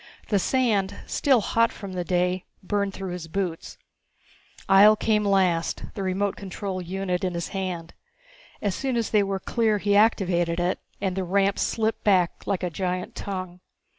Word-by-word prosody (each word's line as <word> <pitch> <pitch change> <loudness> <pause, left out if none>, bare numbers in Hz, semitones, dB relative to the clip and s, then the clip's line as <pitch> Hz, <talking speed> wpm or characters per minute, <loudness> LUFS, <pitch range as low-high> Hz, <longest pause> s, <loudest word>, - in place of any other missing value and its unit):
The 205 - +3
sand, 210 -4 +1
still 265 -6 +2
hot 230 +3 +2
from 195 -3 -8
the 180 -1 -2
day, 180 +1 0 0.2
burned 200 +1 0
through 190 -1 -6
his 175 -2 -6
boots. 175 -1 -4 0.9
Ihjel 205 +2 +7
came 215 -1 +2
last, 185 -5 +1
the 200 - -5
remote 195 +1 0
control 190 -1 -5
unit 180 0 -2
in 180 -2 -1
his 170 - -3
hand. 180 -4 -4 0.7
As 200 -2 +1
soon 260 +3 -1
as 230 - -1
they 210 - +4
were 195 -1 -1
clear 220 0 +1
he 205 0 +1
activated 180 -5 +3
it 175 +1 0 0.2
and 190 -2 -1
the 190 - -1
ramp 195 +2 +1
slipped 225 0 0
back 185 -5 +2
like 190 -2 -1
a 180 - -1
giant 180 +1 -3
tongue. 185 -2 -5
195 Hz, 165 wpm, -25 LUFS, 180-205 Hz, 0.9 s, Ihjel